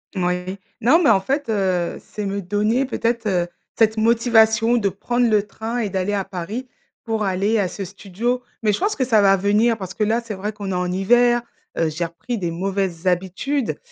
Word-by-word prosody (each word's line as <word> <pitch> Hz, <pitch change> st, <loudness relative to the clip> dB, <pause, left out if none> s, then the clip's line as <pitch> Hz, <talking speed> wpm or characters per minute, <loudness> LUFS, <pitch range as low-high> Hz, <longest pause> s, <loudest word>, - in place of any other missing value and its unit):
Ouais, 180 Hz, +1 st, -1 dB, 0.2 s
non 275 Hz, +10 st, +5 dB
mais -, -, +5 dB
en 195 Hz, -, +5 dB
fait, 270 Hz, +6 st, -2 dB
heu, 185 Hz, -5 st, 0 dB
c'est 210 Hz, -, -7 dB
me 200 Hz, 0 st, -2 dB
donner 210 Hz, +8 st, +1 dB
peut-être, 230 Hz, -3 st, -1 dB
heu, 180 Hz, -3 st, +1 dB, 0.3 s
cette 220 Hz, -1 st, +3 dB
motivation 225 Hz, 0 st, +4 dB
de 205 Hz, -4 st, +1 dB
prendre 240 Hz, +6 st, 0 dB
le 210 Hz, -1 st, +2 dB
train 225 Hz, +3 st, -4 dB
et 215 Hz, -, -1 dB
d'aller 190 Hz, +2 st, -1 dB
à 200 Hz, -1 st, 0 dB
Paris, 200 Hz, +7 st, -5 dB, 0.4 s
pour 225 Hz, -2 st, -1 dB
aller 195 Hz, +3 st, +1 dB
à 195 Hz, -, +1 dB
ce 195 Hz, +1 st, -5 dB
studio, 210 Hz, +6 st, -3 dB, 0.2 s
mais 210 Hz, -2 st, +3 dB
je -, -, -1 dB
pense 410 Hz, +3 st, 0 dB
que 260 Hz, -, +1 dB
ça 225 Hz, -4 st, +4 dB
va 195 Hz, -1 st, +5 dB
venir 210 Hz, +4 st, +2 dB
parce 190 Hz, -2 st, -7 dB
que 215 Hz, -, -1 dB
là 225 Hz, +3 st, +1 dB
c'est 230 Hz, -2 st, -6 dB
vrai 205 Hz, +2 st, -4 dB
qu'on 205 Hz, -2 st, -6 dB
est -, -, -1 dB
en 180 Hz, 0 st, -1 dB
hiver, 240 Hz, +5 st, +3 dB, 0.4 s
heu, 165 Hz, -, +2 dB
j'ai 160 Hz, +3 st, -3 dB
repris 225 Hz, +8 st, -5 dB
des 175 Hz, -4 st, -2 dB
mauvaises 190 Hz, 0 st, -2 dB
habitudes. 190 Hz, +10 st, -1 dB
205 Hz, 205 wpm, -21 LUFS, 190-230 Hz, 0.4 s, non